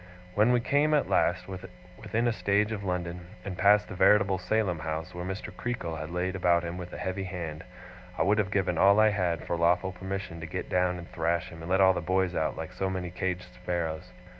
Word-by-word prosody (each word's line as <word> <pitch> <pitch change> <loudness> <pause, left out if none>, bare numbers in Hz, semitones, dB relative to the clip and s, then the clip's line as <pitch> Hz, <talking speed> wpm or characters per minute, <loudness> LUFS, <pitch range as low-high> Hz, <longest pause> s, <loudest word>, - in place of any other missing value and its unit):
When 105 +5 +4
we 125 - +4
came, 145 +4 +3
at 145 - 0
last, 90 +2 +2
within 95 - -4
a 120 - +2
stage 105 0 +1
of 105 -2 -4
London, 90 -2 -3 0.2
and 95 - -4
passed 105 +2 +4
the - - -7
veritable 100 0 +4
Salem 90 -2 0
House 80 +3 -4
where 90 0 -5
Mr. 95 +3 -5
Creakle 90 -10 -3
had 80 0 -5
laid 90 +2 -2
about 85 -2 +3
him 85 +1 -4
with 90 0 -7
a - - -7
heavy 95 +1 -3
hand, 85 -4 -5 0.5
I - - +2
would 105 +2 +3
have 100 -3 +1
given 95 -4 0
all 100 +2 +6
I 110 0 +6
had, 90 -5 -1
for - - -1
lawful 85 +3 +2
permission 95 -2 -5
to 80 - -6
get 90 +2 -5
down 90 0 +1
and 85 -1 -9
thrash 85 +1 -1
him, 80 -1 -11
and 80 - -7
let 95 +1 +3
all 95 0 +6
the - - -2
boys 95 +1 +1
out - - -1
like - - -6
so 95 - -1
many 90 -2 -3
caged 90 0 -3
sparrows. 80 -3 -3
90 Hz, 225 wpm, -28 LUFS, 85-100 Hz, 0.5 s, all